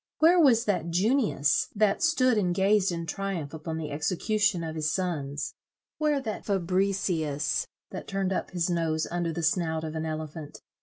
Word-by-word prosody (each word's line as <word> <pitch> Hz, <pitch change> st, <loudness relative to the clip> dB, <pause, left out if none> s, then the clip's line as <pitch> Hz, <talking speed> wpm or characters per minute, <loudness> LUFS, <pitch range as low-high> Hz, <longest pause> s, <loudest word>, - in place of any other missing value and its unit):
Where 340 Hz, +3 st, +5 dB
was 245 Hz, -7 st, +5 dB
that 180 Hz, -5 st, 0 dB
Junius, 195 Hz, -, +2 dB
that 205 Hz, -1 st, +2 dB
stood 255 Hz, -8 st, +3 dB
and 180 Hz, -4 st, +1 dB
gazed 195 Hz, 0 st, +3 dB
in 170 Hz, -1 st, -3 dB
triumph 175 Hz, -4 st, -4 dB
upon 160 Hz, 0 st, -5 dB
the 155 Hz, -2 st, -4 dB
execution 180 Hz, +5 st, 0 dB
of 160 Hz, -1 st, -4 dB
his 155 Hz, -1 st, -1 dB
sons? 150 Hz, -6 st, -2 dB, 0.5 s
Where 300 Hz, -2 st, +2 dB
that 225 Hz, -5 st, -5 dB
Fabricius, 180 Hz, -6 st, 0 dB, 0.2 s
that -, -, -7 dB
turned 195 Hz, -1 st, -1 dB
up -, -, -2 dB
his 175 Hz, -2 st, -1 dB
nose 165 Hz, -3 st, 0 dB
under 175 Hz, -1 st, -1 dB
the 170 Hz, +1 st, -4 dB
snout 160 Hz, -1 st, 0 dB
of 155 Hz, -1 st, -4 dB
an 160 Hz, 0 st, -2 dB
elephant? 155 Hz, -1 st, -6 dB
175 Hz, 165 wpm, -27 LUFS, 160-205 Hz, 0.5 s, Where